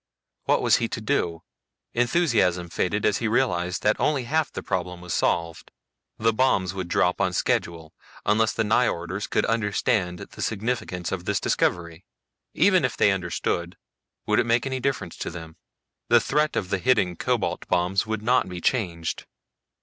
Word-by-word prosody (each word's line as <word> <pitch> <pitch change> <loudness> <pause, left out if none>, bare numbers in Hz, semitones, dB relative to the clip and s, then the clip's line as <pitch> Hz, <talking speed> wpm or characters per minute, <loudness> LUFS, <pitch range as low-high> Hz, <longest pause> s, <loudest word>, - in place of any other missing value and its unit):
What - - +2
was - - +5
he - - -1
to - - -5
do? 85 -1 -1 0.5
Enthusiasm 115 - +1
faded 100 +4 -1
as 105 - +2
he 115 - -1
realized 90 -7 0
that 105 - +2
only 145 -4 +1
half 155 +5 +1
of - - -28
the - - -5
problem 90 -1 -3
was 90 -2 -5
solved. 85 +1 -1 0.5
The 115 +1 +2
bombs 100 -7 +2
would 95 -2 -4
drop 90 +2 +1
on 95 -2 +1
schedule 80 -2 -1 0.3
unless 110 +1 +3
the 115 - -1
Nyjorders 100 -4 0
could - - +1
understand 105 -4 0
the - - -10
significance 100 -5 -2
of 90 -2 -4
this 100 0 0
discovery. 85 -1 -1 0.5
Even 185 -5 +4
if 130 - -1
they 105 - +4
understood, 90 -2 -2 0.5
would - - +2
it - - +1
make 115 +1 +2
any 130 -1 -2
difference 120 -10 -2
to - - -4
them? 80 -2 -9 0.5
The 120 - +7
threat 150 +5 0
of 95 - -2
the 95 - +1
hidden 95 -7 +2
cobalt - - -1
bombs 90 +4 +1
would 110 -1 -3
not 125 -2 +2
be 90 -1 -6
changed. 85 -7 -2
95 Hz, 170 wpm, -25 LUFS, 90-115 Hz, 0.5 s, The